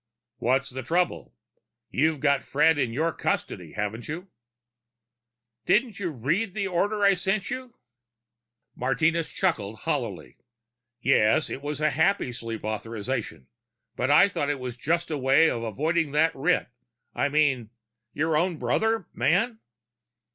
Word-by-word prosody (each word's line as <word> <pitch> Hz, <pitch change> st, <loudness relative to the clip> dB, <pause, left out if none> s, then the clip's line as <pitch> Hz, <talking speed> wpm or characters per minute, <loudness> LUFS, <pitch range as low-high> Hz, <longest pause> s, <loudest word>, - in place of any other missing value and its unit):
"What's 130 Hz, +3 st, +1 dB
the 130 Hz, +1 st, -5 dB
trouble? 160 Hz, -, -1 dB, 0.6 s
You've 155 Hz, +1 st, +1 dB
got 140 Hz, -2 st, +2 dB
Fred 150 Hz, +2 st, +3 dB
in 125 Hz, -, 0 dB
your 160 Hz, +7 st, 0 dB
custody, -, -, -3 dB
haven't 105 Hz, +2 st, -4 dB
you?" 175 Hz, +5 st, -6 dB, 1.4 s
"Didn't 230 Hz, -3 st, +2 dB
you 185 Hz, -3 st, -2 dB
read 160 Hz, -, -1 dB
the 200 Hz, -1 st, -2 dB
order 205 Hz, +3 st, 0 dB
I 200 Hz, 0 st, +6 dB
sent 195 Hz, +3 st, -1 dB
you?" 255 Hz, -1 st, -6 dB, 1.0 s
Martinez 155 Hz, +6 st, 0 dB
chuckled 110 Hz, -, -1 dB
hollowly. 120 Hz, -, -3 dB
"Well, -, -, -44 dB, 0.6 s
yes 120 Hz, +2 st, +3 dB
it 135 Hz, -, -5 dB
was 145 Hz, 0 st, -4 dB
a 155 Hz, 0 st, +3 dB
Happysleep 125 Hz, -, -1 dB
authorization. 110 Hz, -, -4 dB, 0.5 s
But 125 Hz, -, -1 dB
I 150 Hz, +7 st, +7 dB
thought 145 Hz, -7 st, -2 dB
it 145 Hz, -, 0 dB
was 125 Hz, -2 st, -5 dB
just 165 Hz, +7 st, -1 dB
a 150 Hz, -, -1 dB
way 135 Hz, +5 st, +4 dB
of 115 Hz, -, -3 dB
avoiding 150 Hz, -, -1 dB
that 160 Hz, +2 st, +3 dB
writ... 155 Hz, +4 st, +1 dB, 0.4 s
I 145 Hz, -, 0 dB
mean... 140 Hz, -6 st, +1 dB, 0.4 s
your 160 Hz, +1 st, 0 dB
own 170 Hz, +2 st, +1 dB
brother, 220 Hz, -, 0 dB
man?" 180 Hz, -, +1 dB
150 Hz, 140 wpm, -26 LUFS, 125-175 Hz, 1.4 s, I